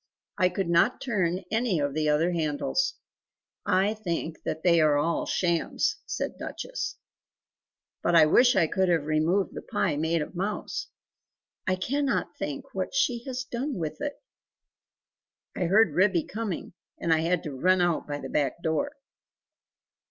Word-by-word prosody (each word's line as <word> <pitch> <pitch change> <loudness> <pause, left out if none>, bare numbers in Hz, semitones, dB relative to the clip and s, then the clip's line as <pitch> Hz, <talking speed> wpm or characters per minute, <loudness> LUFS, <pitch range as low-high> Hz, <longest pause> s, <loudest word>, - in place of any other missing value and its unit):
I 185 -1 +4
could 185 0 -2
not 170 +8 +3
turn 185 -7 -1
any 220 -6 +1
of 145 -1 -1
the 155 0 +1
other 160 +4 +2
handles; 170 - 0 0.7
I 195 +2 +3
think 170 -6 -4
that 160 - -3
they 170 -2 +5
are 150 -2 +4
all 165 +3 0
shams," 170 -2 0
said - - -3
Duchess, - - -5 1.0
"but 175 - +2
I 160 -2 +8
wish 245 +11 +5
I - - +4
could 190 +3 +1
have 165 -4 +2
removed 160 +6 +1
the - - -6
pie 160 -7 -1
made 160 +1 +1
of - - -10
mouse! 205 - -3 0.8
I 185 - +3
cannot 265 -2 -1
think 145 -2 -5
what 190 -1 -3
she 235 +6 +1
has 255 -2 -3
done 260 +3 -3
with 160 - -4
it? 290 -1 -2 1.4
I 180 - -1
heard 195 -1 +4
Ribby 180 -1 +3
coming 210 -6 -5 0.2
and 165 - +1
I 160 - +3
had 170 +2 +1
to 150 - -5
run 180 +8 +2
out 175 -2 +1
by 145 -1 -3
the - - -6
back 145 +3 -1
door!" 225 - 0
175 Hz, 160 wpm, -27 LUFS, 160-210 Hz, 1.4 s, I